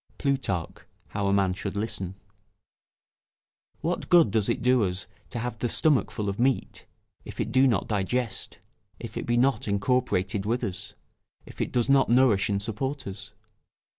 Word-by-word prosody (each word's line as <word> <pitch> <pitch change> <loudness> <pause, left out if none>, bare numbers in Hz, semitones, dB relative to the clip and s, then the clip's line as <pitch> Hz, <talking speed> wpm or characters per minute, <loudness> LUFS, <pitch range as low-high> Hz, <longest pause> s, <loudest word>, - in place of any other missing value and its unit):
[Plutarch, 135 - -1 0.3
How 100 -1 -2
a - - +2
Man 95 -2 +2
should 100 +1 -5
Listen.] 95 -3 -3 1.7
What 170 +3 -2
good 170 - +6
does 105 -1 +1
it - - -1
do 125 -2 +4
us 90 0 -2 0.2
to 120 - -6
have 115 -1 -4
the 120 - -1
stomach 150 -2 +3
full 105 -2 -4
of 100 +2 -3
meat, 130 +1 0 0.4
if - - -10
it - - -1
do 130 +1 +5
not 110 -8 +1
digest, 110 +2 -1 0.4
if - - -8
it - - -4
be 120 0 +2
not 130 0 +2
incorporated 100 -2 0
with 115 +4 -1
us, 95 - -5 0.5
if - - -8
it - - -2
does 120 -2 +1
not 135 -3 +4
nourish 120 -4 +4
and 100 -1 +1
support 130 +6 -3
us? 95 -1 -8
115 Hz, 165 wpm, -27 LUFS, 100-130 Hz, 1.7 s, good